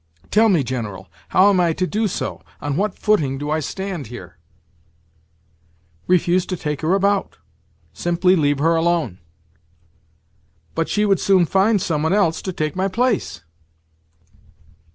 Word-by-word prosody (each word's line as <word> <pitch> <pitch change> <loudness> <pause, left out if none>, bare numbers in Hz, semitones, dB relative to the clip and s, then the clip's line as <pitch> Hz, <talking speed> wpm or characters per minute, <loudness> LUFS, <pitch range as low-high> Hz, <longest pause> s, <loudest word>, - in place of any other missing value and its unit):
"Tell 220 +1 +4
me, 170 -8 +3
General, 105 -8 -5 0.2
how 195 +2 +5
am 190 - +2
I 170 -2 +2
to 185 - -1
do 215 +4 -1
so? - - -4 0.2
On 145 -1 -3
what 200 +3 -1
footing 150 -11 +1
do 145 +2 -4
I 155 - +1
stand 180 - -5
here?" 105 -7 -11 1.7
"Refuse 180 0 +2
to 185 - -3
take 150 -3 -4
her 165 +4 +2
about. 200 0 0 0.6
Simply 175 +2 +2
leave 145 -4 +1
her 165 +4 +2
alone." 165 - 0 1.5
"But 165 0 -2
she 210 0 +1
would 195 -2 +2
soon 190 -3 +3
find 195 +5 +2
some 160 -4 -1
one 160 +3 +1
else 195 -6 +1
to 190 - -4
take 155 -4 -3
my 190 +1 0
place?" 220 - -1
175 Hz, 150 wpm, -20 LUFS, 150-195 Hz, 1.7 s, how